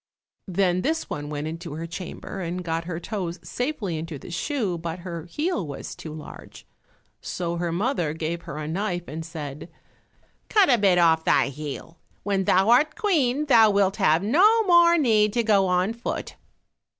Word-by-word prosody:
Then 185 Hz, -1 st, +1 dB
this 320 Hz, -, -2 dB
one 145 Hz, 0 st, -4 dB
went 150 Hz, 0 st, -4 dB
into 165 Hz, +1 st, -6 dB
her 160 Hz, +2 st, -5 dB
chamber 180 Hz, +2 st, -7 dB
and 180 Hz, +1 st, -4 dB
got 165 Hz, -1 st, -2 dB
her 170 Hz, -1 st, -4 dB
toes 175 Hz, -3 st, -4 dB
safely 240 Hz, -, -3 dB
into 160 Hz, -1 st, -6 dB
the 155 Hz, -, -11 dB
shoe, 200 Hz, -, -2 dB
but 170 Hz, +1 st, -5 dB
her 170 Hz, -3 st, -6 dB
heel 295 Hz, -, -2 dB
was 140 Hz, -, -7 dB
too 160 Hz, -, -9 dB
large. 155 Hz, -1 st, -11 dB, 0.6 s
So 170 Hz, -1 st, -3 dB
her 170 Hz, 0 st, -2 dB
mother 175 Hz, -, 0 dB
gave 165 Hz, +1 st, -3 dB
her -, -, -5 dB
a 150 Hz, -1 st, -4 dB
knife 175 Hz, +1 st, -3 dB
and 160 Hz, +2 st, -6 dB
said, 155 Hz, -1 st, -7 dB, 0.8 s
"Cut 405 Hz, -9 st, +5 dB
a 240 Hz, -, +4 dB
bit 195 Hz, -3 st, +4 dB
off 165 Hz, -2 st, +4 dB
thy -, -, +3 dB
heel; 150 Hz, +3 st, -8 dB, 0.2 s
when 195 Hz, -2 st, 0 dB
thou 190 Hz, +5 st, +4 dB
art 295 Hz, +6 st, +4 dB
Queen 300 Hz, -, +1 dB
thou 230 Hz, -6 st, +6 dB
wilt 200 Hz, -1 st, +2 dB
have 170 Hz, -4 st, +3 dB
no 405 Hz, -, +4 dB
more 345 Hz, -3 st, +5 dB
need 215 Hz, -8 st, +3 dB
to 235 Hz, -, +1 dB
go 200 Hz, -3 st, +3 dB
on 180 Hz, +4 st, +1 dB
foot." 235 Hz, -, -5 dB
180 Hz, 175 wpm, -24 LUFS, 165-230 Hz, 0.8 s, thou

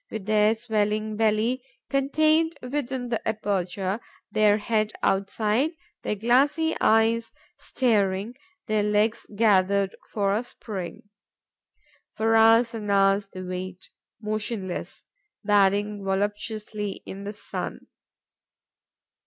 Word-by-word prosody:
With 220 Hz, -3 st, -6 dB
their 215 Hz, +1 st, +3 dB
swelling 215 Hz, -1 st, -1 dB
belly 225 Hz, +3 st, +1 dB, 0.3 s
contained 310 Hz, +3 st, +2 dB
within 260 Hz, -1 st, -3 dB
the 230 Hz, -, -1 dB
aperture, 200 Hz, -2 st, -1 dB, 0.3 s
their 210 Hz, -1 st, +4 dB
head 215 Hz, 0 st, 0 dB
outside, 215 Hz, -, +1 dB, 0.3 s
their -, -, -2 dB
glassy 275 Hz, +9 st, +2 dB
eyes 225 Hz, +1 st, +3 dB, 0.3 s
staring, 205 Hz, -3 st, 0 dB, 0.3 s
their 215 Hz, -1 st, +1 dB
legs 210 Hz, +2 st, +1 dB
gathered 200 Hz, -2 st, +3 dB, 0.2 s
for 200 Hz, -2 st, +1 dB
a 220 Hz, +4 st, 0 dB
spring, 195 Hz, -7 st, -7 dB, 1.1 s
for 225 Hz, +1 st, +2 dB
hours 225 Hz, +2 st, +5 dB
and 215 Hz, -2 st, -5 dB
hours 195 Hz, 0 st, +3 dB
they 185 Hz, -1 st, -8 dB
wait, 185 Hz, 0 st, -6 dB, 0.3 s
motionless, 210 Hz, -3 st, -4 dB, 0.4 s
bathing 205 Hz, 0 st, +2 dB
voluptuously 205 Hz, +1 st, -3 dB
in 195 Hz, +1 st, -7 dB
the 205 Hz, +1 st, -5 dB
sun. 210 Hz, -, -6 dB
215 Hz, 105 wpm, -25 LUFS, 200-230 Hz, 1.1 s, hours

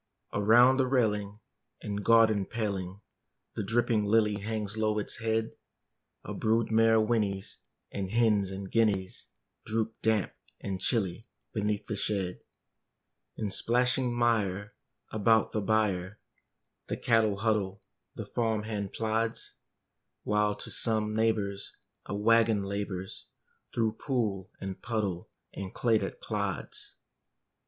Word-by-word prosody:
Around 120 Hz, +5 st, +6 dB
the 130 Hz, -1 st, +2 dB
railing 105 Hz, -5 st, 0 dB, 0.4 s
and 105 Hz, 0 st, -3 dB
garden 110 Hz, -3 st, +4 dB
paling 100 Hz, -4 st, -3 dB, 0.5 s
The -, -, -3 dB
dripping 110 Hz, +1 st, +1 dB
lily 105 Hz, 0 st, +3 dB
hangs 105 Hz, 0 st, -3 dB
low 110 Hz, -1 st, +1 dB
its 105 Hz, -, -2 dB
head: 110 Hz, 0 st, -1 dB, 0.7 s
A -, -, -6 dB
brood 110 Hz, +1 st, +1 dB
mare 110 Hz, 0 st, +5 dB
whinnies; 105 Hz, -3 st, -1 dB, 0.3 s
and 95 Hz, -2 st, -3 dB
hens 105 Hz, -3 st, +3 dB
and 95 Hz, 0 st, -6 dB
guineas 105 Hz, -5 st, +1 dB, 0.4 s
Droop, 110 Hz, 0 st, -1 dB
damp 110 Hz, -3 st, +1 dB, 0.3 s
and 95 Hz, -1 st, -4 dB
chilly, 105 Hz, -1 st, -1 dB, 0.3 s
beneath 105 Hz, -1 st, -1 dB
the 105 Hz, -, -3 dB
shed. 95 Hz, -3 st, -1 dB, 1.0 s
In 105 Hz, -3 st, -2 dB
splashing 125 Hz, +4 st, +1 dB
mire 110 Hz, -3 st, 0 dB, 0.4 s
about 110 Hz, +1 st, +3 dB
the 110 Hz, -, -1 dB
byre 100 Hz, -2 st, 0 dB, 0.7 s
The -, -, -3 dB
cattle 110 Hz, -4 st, +2 dB
huddle, 100 Hz, -3 st, 0 dB, 0.3 s
the -, -, -5 dB
farm 110 Hz, -3 st, -1 dB
hand 105 Hz, -3 st, -4 dB
plods; 115 Hz, +1 st, -1 dB, 0.7 s
While 105 Hz, 0 st, +1 dB
to -, -, -8 dB
some 110 Hz, -2 st, 0 dB
neighbor's 105 Hz, -3 st, 0 dB, 0.3 s
a -, -, -3 dB
wagon 110 Hz, 0 st, +3 dB
labors 100 Hz, -1 st, -5 dB, 0.4 s
Through 110 Hz, -1 st, 0 dB
pool 105 Hz, -9 st, -1 dB
and 95 Hz, -1 st, -6 dB
puddle 105 Hz, -7 st, -2 dB, 0.2 s
and 95 Hz, -1 st, -6 dB
clay 115 Hz, -3 st, +3 dB
that -, -, -5 dB
clods. -, -, -4 dB
105 Hz, 120 wpm, -29 LUFS, 100-115 Hz, 1.0 s, Around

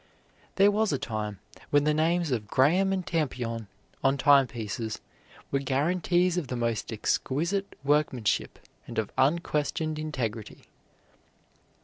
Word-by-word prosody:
There 200 Hz, +1 st, +5 dB
was 215 Hz, -1 st, +1 dB
a 140 Hz, -, +1 dB
time 105 Hz, -4 st, -4 dB, 0.3 s
when 145 Hz, 0 st, +4 dB
the 150 Hz, +1 st, +2 dB
names 165 Hz, +1 st, +1 dB
of 110 Hz, -4 st, -1 dB
Graham 175 Hz, -, +3 dB
and 190 Hz, -2 st, -1 dB
Tampion 120 Hz, -, -2 dB, 0.4 s
on 135 Hz, +1 st, +3 dB
timepieces 120 Hz, -6 st, +2 dB, 0.5 s
were 140 Hz, -, +1 dB
guarantees 175 Hz, +6 st, +1 dB
of 155 Hz, -, -6 dB
the 125 Hz, -, -3 dB
most 115 Hz, -3 st, -2 dB
exquisite 170 Hz, -, -1 dB
workmanship 140 Hz, -7 st, +1 dB, 0.3 s
and -, -, -8 dB
of 110 Hz, -2 st, -1 dB
unquestioned 155 Hz, +2 st, 0 dB
integrity. 120 Hz, -8 st, -4 dB
140 Hz, 120 wpm, -28 LUFS, 120-170 Hz, 0.5 s, There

